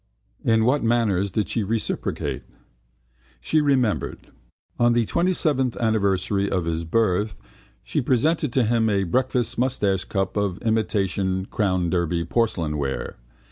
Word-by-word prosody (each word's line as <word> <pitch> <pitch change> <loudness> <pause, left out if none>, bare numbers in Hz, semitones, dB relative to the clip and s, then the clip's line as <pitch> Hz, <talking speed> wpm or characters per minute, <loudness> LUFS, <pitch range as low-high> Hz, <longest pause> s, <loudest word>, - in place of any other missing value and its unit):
In 110 -1 +3
what 140 +4 +2
manners 115 -5 +1
did 105 +3 -1
she 115 - -1
reciprocate? 110 +2 -2 1.0
She 155 - +1
remembered: 130 -7 0 0.5
on 120 0 +4
the 120 -1 +2
27th 155 - +1
anniversary 100 -3 +1
of 90 -3 -1
his 85 0 -2
birth 105 +2 0 0.4
she - - -1
presented 140 +4 +1
to 130 - +3
him 115 0 +2
a 100 -2 +1
breakfast 125 +6 0
moustachecup 100 -6 0
of 100 -3 0
imitation 100 -4 0
Crown 95 -6 0
Derby 85 -1 0
porcelain 85 -7 0
ware. 70 -1 -3
110 Hz, 125 wpm, -23 LUFS, 95-120 Hz, 1.0 s, on